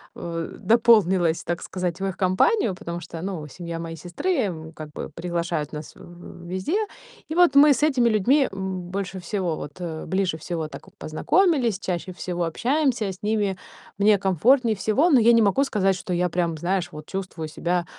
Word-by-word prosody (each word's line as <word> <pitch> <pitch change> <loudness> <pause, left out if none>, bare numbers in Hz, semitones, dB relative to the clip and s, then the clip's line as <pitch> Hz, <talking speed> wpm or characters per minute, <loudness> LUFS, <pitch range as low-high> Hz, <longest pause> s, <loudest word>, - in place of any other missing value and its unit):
э, 165 -1 -5
дополнилась, 190 -6 +4
так 175 +1 -3
сказать, 180 -1 -3
в 195 - -2
их 190 -1 -3
компанию, 195 - +2
потому 170 -1 -6
что, 165 - -8
ну, 180 -5 -4
семья 170 +2 -6
моей 165 0 -6
сестры, 175 - -4 0.2
м, 160 -3 -6
как 155 -2 -9
бы - - -6
приглашают 170 -3 -3
нас 150 0 -8
в - - -18
в 175 0 -12
везде. 190 - -1 0.5
И 315 - -3
вот 350 -4 +5
мы 290 0 +8
с 295 - -2
этими 265 -6 +3
людьми, 255 +7 +3
м, 190 -1 -4
больше 195 -1 -4
всего 180 -2 -2
вот, 145 - -7
э, 160 -3 -5
ближе 190 -3 0
всего 160 0 -4
так - - -10
познакомились, 250 - +1
чаще 180 -1 -3
всего 175 -1 -3
общаемся. 240 - 0
С 185 - -12
ними 205 -3 0 0.4
мне 205 +1 +5
комфортнее 220 - +3
всего, 235 - +2
но 270 - +6
я 235 +1 +6
не 230 - +5
могу 210 +7 +3
сказать, 195 -6 +1
что 180 -1 -4
я 180 +1 +1
прям, 170 -1 -1
знаешь, 175 0 -1
вот 150 0 -9
чувствую 185 -4 -5
себя, 175 +2 -1
185 Hz, 185 wpm, -24 LUFS, 170-220 Hz, 0.5 s, мы